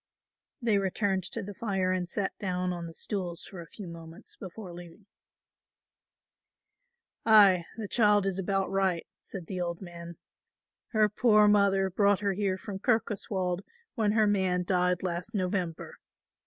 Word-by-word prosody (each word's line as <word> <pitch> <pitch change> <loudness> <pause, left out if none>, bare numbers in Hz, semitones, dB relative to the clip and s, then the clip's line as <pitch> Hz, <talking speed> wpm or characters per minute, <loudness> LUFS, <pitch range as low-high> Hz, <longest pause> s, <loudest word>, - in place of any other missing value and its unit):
They 215 -4 +3
returned 190 -1 0
to 225 +4 -4
the 205 +1 -7
fire 195 -3 -1
and 180 -1 -1
sat 195 +2 -2
down 180 -2 -1
on 170 -1 -5
the 165 - -10
stools 180 -4 -4
for 185 -4 -9
a 165 - -11
few 205 -4 -9
moments 165 0 -11
before 190 -1 -9
leaving. 175 +3 -12 2.2
"Ay, 200 -6 +6
the 220 -2 -4
child 210 -2 +4
is 195 -1 -1
about 195 0 -1
right," 190 -3 +1
said 185 -4 -8
the 185 +1 -4
old 170 -1 -3
man, 170 -2 -9 0.7
"her 215 -2 +3
poor 210 0 +4
mother 195 -2 +3
brought 200 +1 +3
her 200 -1 +1
here 190 -1 -1
from 195 0 -7
Kirkoswald 195 -5 0 0.3
when 210 -3 +1
her 220 -1 +4
man 190 -3 +1
died 180 -1 +1
last 180 +5 -3
November. 180 -3 -2
190 Hz, 150 wpm, -29 LUFS, 180-205 Hz, 2.2 s, Ay